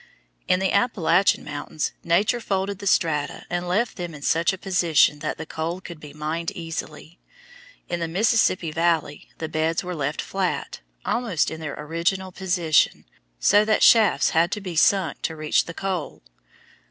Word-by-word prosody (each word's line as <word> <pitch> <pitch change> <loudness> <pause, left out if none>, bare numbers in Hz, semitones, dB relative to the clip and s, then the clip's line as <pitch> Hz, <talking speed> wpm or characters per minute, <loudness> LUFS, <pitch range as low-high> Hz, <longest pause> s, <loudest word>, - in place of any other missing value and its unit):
In 180 - +3
the 190 0 0
Appalachian 200 -5 +2
mountains 145 +1 -4
Nature 200 +8 +2
folded 195 -2 -2
the 200 - -5
strata 150 -6 0
and 175 0 -2
left 215 +7 0
them 175 -3 -5
in 145 - -11
such 165 +3 +2
a 190 - -6
position 170 -6 +2
that - - -3
the 160 - -6
coal 165 +3 -4
could 170 -3 -10
be 150 -1 -11
mined 155 +3 -3
easily. 165 0 -7 0.7
In 175 - -3
the 165 - -2
Mississippi 185 -2 +2
Valley 165 -2 -1
the 160 - -4
beds 160 +1 -1
were 180 0 -4
left 145 -2 -3
flat, 190 -2 -2 0.3
almost 225 -10 0
in 160 - -6
their 155 -3 -5
original 170 +5 -2
position, 175 -4 +1 0.3
so 205 - +5
that 215 0 +2
shafts 215 - +5
had 170 +3 +2
to 210 - -3
be 185 -4 -6
sunk 175 -1 +2
to 160 - -2
reach 155 -1 +1
the 165 - -7
coal. 185 - -4
170 Hz, 165 wpm, -24 LUFS, 160-190 Hz, 0.7 s, so